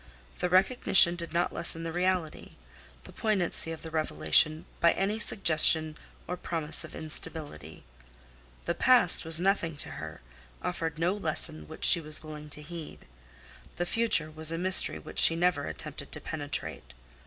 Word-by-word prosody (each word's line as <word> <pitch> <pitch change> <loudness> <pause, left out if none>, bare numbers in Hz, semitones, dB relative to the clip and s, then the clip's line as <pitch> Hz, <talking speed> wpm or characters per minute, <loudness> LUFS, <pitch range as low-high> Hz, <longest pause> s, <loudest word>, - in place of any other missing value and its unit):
The 180 - -1
recognition 185 -2 +3
did 170 -1 -4
not 175 +1 -1
lessen 165 -1 +2
the 165 -1 -5
reality, 180 -2 -3 0.5
the - - -13
poignancy 190 -6 -1
of 165 - -9
the 160 - -9
revelation 155 0 +1
by 170 - +3
any 205 +3 -2
suggestion 160 -6 +3 0.3
or 180 - -5
promise 160 -3 -1
of - - -11
instability. 155 - -7 0.8
The - - -1
past 240 -3 +4
was 160 0 0
nothing 175 -4 -1
to - - -5
her; 80 +1 -9 0.4
offered 165 -3 -4
no 170 +3 0
lesson 155 - -2
which - - -3
she 170 - +6
was 155 0 +4
willing 150 -1 -10
to 150 +1 -10
heed. 165 0 -10 0.7
The 175 - -3
future 200 -8 +2
was 160 +1 -3
a 165 - -3
mystery 185 +2 +4
which - - -5
she 165 - +7
never 170 -4 0
attempted - - -5
to - - -2
penetrate. - - -5
165 Hz, 155 wpm, -28 LUFS, 155-180 Hz, 0.8 s, she